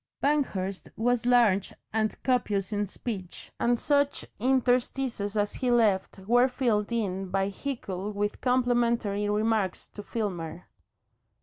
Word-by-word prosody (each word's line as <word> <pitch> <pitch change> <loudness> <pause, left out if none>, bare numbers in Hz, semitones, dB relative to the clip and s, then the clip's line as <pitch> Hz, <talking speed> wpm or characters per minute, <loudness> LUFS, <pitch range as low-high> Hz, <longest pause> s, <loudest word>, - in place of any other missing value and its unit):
Banghurst 200 -10 0
was 245 +2 +1
large 230 -6 +3 0.2
and 220 -1 +1
copious 210 -6 0
in 205 0 0
speech, 195 -3 -7
and 240 0 +2
such 285 -1 +1
interstices 250 -3 +1
as 205 0 +1
he 255 - -1
left 215 -7 +2
were 245 +2 +5
filled 235 -5 0
in 195 -5 -2
by 195 +1 0
Hickle 200 -4 -4
with 205 0 -2
complimentary 235 -5 +1
remarks 210 -2 0
to 205 - -9
Filmer. 180 -6 -4
220 Hz, 120 wpm, -28 LUFS, 200-245 Hz, 0.2 s, were